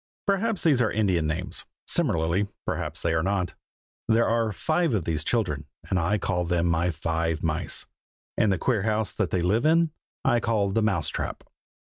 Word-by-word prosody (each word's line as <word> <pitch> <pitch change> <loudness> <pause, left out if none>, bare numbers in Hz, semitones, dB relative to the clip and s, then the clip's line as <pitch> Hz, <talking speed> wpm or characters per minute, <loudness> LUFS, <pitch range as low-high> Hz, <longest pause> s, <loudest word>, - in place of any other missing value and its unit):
Perhaps 200 +1 +1
these 145 -7 +4
are 115 - +3
Indian 95 -7 +1
names; 90 +4 -3 0.2
similarly, 85 +5 +1 0.2
perhaps - - -3
they 85 - +1
are 80 - +2
not. 95 -1 -1 0.5
There 115 +1 +3
are 115 -1 +1
five 160 - +1
of 90 -7 -1
these 80 -2 -1
children, 75 - -1 0.2
and 95 - +3
I 95 +6 +1
call 90 -3 -1
them 85 0 +1
my 85 +1 +2
Five 80 0 -1
Mice; 80 0 0 0.5
and 105 - +3
the 95 - +1
queer 110 +4 +1
house 110 +1 0
that - - -1
they 90 - 0
live 100 +8 +2
in 165 +1 +4 0.3
I 120 -3 +4
call 105 -4 +1
the 115 - +1
Mouse 95 -8 +1
trap. - - -4
95 Hz, 180 wpm, -26 LUFS, 85-115 Hz, 0.5 s, these